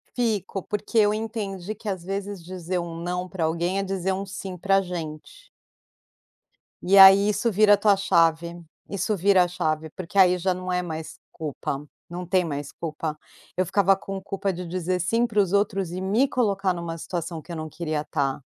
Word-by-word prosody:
Fico 210 -5 -1
porque 210 +4 -4
eu 210 -1 +5
entendi 215 -3 -4
que 220 +1 -12
às 185 -4 -3
vezes 195 -1 -5
dizer 180 0 -4
um 170 -1 -5
não 180 +2 -3
pra 175 -3 -2
alguém 170 +4 0
é - - 0
dizer 190 -1 -2
um 190 +1 -2
sim 190 -1 -7
pra 195 +2 +3
gente. 175 - -7 1.4
E 195 +2 +4
aí 195 +1 +9
isso 225 +3 +1
vira 210 +1 +5
a - - -7
tua 205 0 +4
chave, 170 -2 +2 0.3
isso 200 +2 -1
vira 190 0 +4
a - - 0
chave 160 -2 -2
porque 185 +3 -7
aí 180 -1 +6
já 185 +2 +1
não 185 0 -3
é 180 - +1
mais 160 -2 -6
culpa, 145 -2 -5 0.2
não 175 +1 -5
tem 180 +1 +2
mais 145 -3 -4
culpa. 155 -1 -4 0.4
Eu 185 - +1
ficava 195 +1 +4
com 195 0 -6
culpa 195 0 -2
de 180 0 -6
dizer 180 +1 -2
sim 230 +7 +1
pros 205 -4 +1
outros 195 -3 +1
e 185 - -4
me 215 +9 +2
colocar 200 -7 +1
numa 170 -1 -5
situação 170 0 -4
que 165 - -12
eu 170 - -4
não 155 0 -5
queria 155 -2 -3
tá. 140 -2 -2
185 Hz, 190 wpm, -25 LUFS, 170-195 Hz, 1.4 s, aí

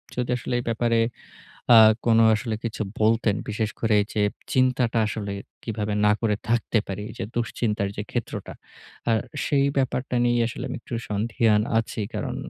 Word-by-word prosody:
যদি 125 0 -2
আসলে 125 - -5
এই - - -4
ব্যাপারে 115 0 +1 0.8
আ - - +10 0.3
কোনো 115 -1 +5
আসলে 110 0 -3
কিছু 115 -1 -3 0.2
বলতেন, 110 -1 +3
বিশেষ 105 0 -1
করে 110 -2 +3 0.2
যে 105 - +1 0.3
চিন্তাটা 130 -3 +2
আসলে 100 -1 -4 0.3
কিভাবে 105 -2 -3
না 105 - +6
করে 110 -3 +1
থাকতে 115 0 +1
পারি। 100 +1 -4
যে - - -3
দুশ্চিন্তার 110 -3 -1
যে - - -1
ক্ষেত্রটা। - - -4 0.6
আর 115 - +4 0.3
সেই 140 -1 +2
ব্যাপারটা 130 -1 -1
নিয়ে 120 0 +2
আসলে 115 - -6
আমি - - -4
একটু - - -10 0.2
সন্দিহান 105 0 +2 0.2
আছি। 115 -1 -4
কারণ - - -3
115 Hz, 160 wpm, -24 LUFS, 105-120 Hz, 0.8 s, আ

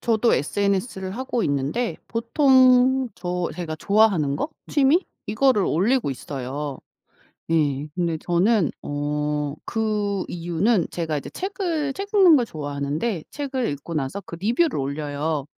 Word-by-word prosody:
저도 230 0 +2
SNS를 190 - -1
하고 255 -2 -2
있는데 145 - -1
보통 255 +1 +4
저 180 -1 -2
제가 165 -3 -5
좋아하는 190 -7 +3
거 - - -2 0.2
취미 295 +5 +3 0.2
이거를 215 0 +3
올리고 220 - +1
있어요. 135 +1 -5 0.7
네 150 -3 +1
근데 170 -2 0
저는 175 +2 +2
어 145 +1 -2 0.4
그 210 -3 -1
이유는 175 +4 0
제가 160 -3 -2
이제 - - -8
책을 350 -7 -2
책 395 +6 -6
읽는 370 -6 +7
걸 245 - +2
좋아하는데 150 +4 -3
책을 270 -4 -2
읽고 145 +4 -5
나서 145 +5 -2
그 170 - -9
리뷰를 240 - +1
올려요. 145 +1 -2
190 Hz, 270 characters per minute, -23 LUFS, 150-245 Hz, 0.7 s, 읽는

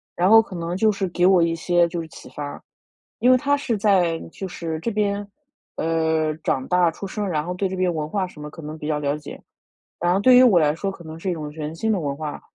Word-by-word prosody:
然 180 +3 +2
后 225 0 +9
可 200 - -10
能 170 0 -3
就 215 +3 +3
是 200 -2 -2
给 175 +1 +1
我 185 -1 +5
一 165 0 +1
些 175 +1 +2
就 170 0 -4
是 160 - -8
启 - - -13
发。 145 -1 -7 0.6
因 250 - +4
为 - - +7
他 285 +2 +1
是 240 -5 -2
在 185 -5 +2
就 190 - -6
是 165 -3 -5
这 230 - -2
边， 205 -1 -1 0.5
呃， 160 -1 +1
长 130 - 0
大 180 -1 +4
出 195 - -8
生， 205 +1 -3
然 150 -3 -1
后 180 - -3
对 190 +1 -1
这 190 - -5
边 185 -1 +1
文 155 -2 -3
化 190 +2 -1
什 155 -4 -13
么 150 - -6
可 165 +1 -11
能 155 +1 -7
比 150 - -6
较 150 -1 0
了 145 0 0
解。 150 - -10 0.6
然 175 +1 +1
后 195 - +2
对 255 +3 +6
于 255 - +8
我 220 -8 +6
来 150 0 +2
说 195 +4 -3
可 190 - -11
能 160 +1 -8
是 185 - -3
一 - - 0
种 150 -2 -6
全 155 +1 -6
新 220 +6 -1
的 205 - +2
文 140 -4 -3
化， 150 0 -5
175 Hz, 285 characters per minute, -23 LUFS, 155-195 Hz, 0.6 s, 后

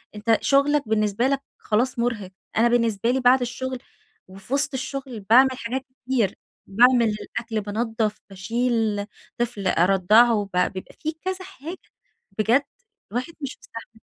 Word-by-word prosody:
أنت 220 +1 +2
شغلك 280 -1 +2
بالنسبة 215 +2 +1
لك 275 0 0 0.2
خلاص 240 +3 0
مُرهق، 220 -6 -2 0.3
أنا 235 +2 +5
بالنسبة 230 -2 +1
لي 265 - +1
بعد 255 +1 +5
الشغل، 255 +1 -3 0.5
وفي 195 +6 -9
وسط 280 0 +1
الشغل 265 -2 -5
باعمل 240 +7 +5
حاجات 255 +3 -3 0.2
كتير. 240 -7 +1 0.3
باعمل 235 +2 +5
الأكل، 225 -2 -4
بانظف، 220 +1 -2
باشيل 220 +1 -1 0.3
طفل 230 -5 -2
أرضعه 200 +4 +4
بع 180 - +3
بيبقى 185 -1 -8
في 315 - -2
كذا 375 0 -4
حاجة. 350 -1 -8 0.6
بجد 235 +6 +3 0.5
الواحد 250 +9 -3
مش 275 -2 -5
مستحمل. - - -11
235 Hz, 135 wpm, -24 LUFS, 210-260 Hz, 0.6 s, أنا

